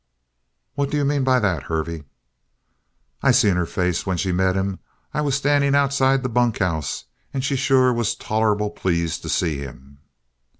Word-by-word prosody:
"What 140 Hz, -1 st, -1 dB
do 150 Hz, -, -1 dB
you 145 Hz, -, +1 dB
mean 140 Hz, -1 st, +1 dB
by 130 Hz, -1 st, +3 dB
that, 95 Hz, -, 0 dB
Hervey?" 80 Hz, -1 st, -3 dB, 1.2 s
"I -, -, +3 dB
seen 100 Hz, -3 st, +4 dB
her 90 Hz, -1 st, 0 dB
face 90 Hz, -1 st, -1 dB
when 95 Hz, -2 st, -2 dB
she 95 Hz, +2 st, -1 dB
met 95 Hz, +1 st, +1 dB
him. 95 Hz, 0 st, -2 dB, 0.3 s
I 150 Hz, -, 0 dB
was 140 Hz, -3 st, 0 dB
standing 140 Hz, 0 st, +2 dB
outside 135 Hz, -1 st, +2 dB
the -, -, 0 dB
bunkhouse. 105 Hz, -, -1 dB, 0.3 s
And 130 Hz, 0 st, -1 dB
she 140 Hz, -, 0 dB
sure 130 Hz, -1 st, +3 dB
was 120 Hz, -3 st, 0 dB
tolerable 105 Hz, -1 st, 0 dB
pleased 85 Hz, -3 st, -1 dB
to -, -, -7 dB
see 80 Hz, -5 st, 0 dB
him." 70 Hz, 0 st, -11 dB
105 Hz, 170 wpm, -22 LUFS, 90-135 Hz, 1.2 s, seen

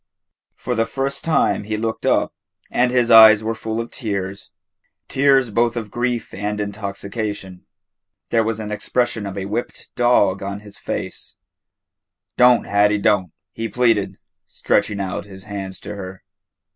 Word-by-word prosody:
For 125 Hz, -, -3 dB
the 115 Hz, -1 st, 0 dB
first 135 Hz, +1 st, -2 dB
time 160 Hz, -9 st, +1 dB
he 110 Hz, 0 st, -2 dB
looked 110 Hz, +1 st, -3 dB
up, -, -, +2 dB, 0.4 s
and 125 Hz, 0 st, +2 dB
his 125 Hz, -1 st, +2 dB
eyes 110 Hz, -1 st, +9 dB
were 110 Hz, +1 st, -1 dB
full 110 Hz, 0 st, -4 dB
of 115 Hz, -, -5 dB
tears 100 Hz, -5 st, -4 dB, 0.6 s
tears 135 Hz, -3 st, +3 dB
both 115 Hz, +2 st, +1 dB
of 110 Hz, -3 st, -5 dB
grief 120 Hz, 0 st, -2 dB
and 105 Hz, +2 st, -3 dB
intoxication. 100 Hz, -1 st, -5 dB, 0.6 s
There 115 Hz, -1 st, +3 dB
was 110 Hz, 0 st, -2 dB
an 105 Hz, -1 st, -5 dB
expression 115 Hz, 0 st, -1 dB
of 100 Hz, 0 st, -6 dB
a 95 Hz, -, -3 dB
whipped 105 Hz, +5 st, -5 dB
dog 120 Hz, -6 st, +3 dB
on 100 Hz, +1 st, -5 dB
his 105 Hz, -1 st, -13 dB
face. -, -, -5 dB, 1.0 s
"Do' 125 Hz, -1 st, +5 dB
Ha'ie, 105 Hz, +1 st, +3 dB
do' 100 Hz, -3 st, +2 dB
" -, -, -64 dB
he 115 Hz, 0 st, -4 dB
pleaded, 115 Hz, -5 st, +1 dB, 0.3 s
stretching 105 Hz, -, 0 dB
out 95 Hz, -1 st, -3 dB
his 95 Hz, -1 st, -12 dB
hands 100 Hz, -2 st, -6 dB
to 105 Hz, -, -7 dB
her. 95 Hz, -2 st, -8 dB
105 Hz, 155 wpm, -20 LUFS, 100-120 Hz, 1.0 s, eyes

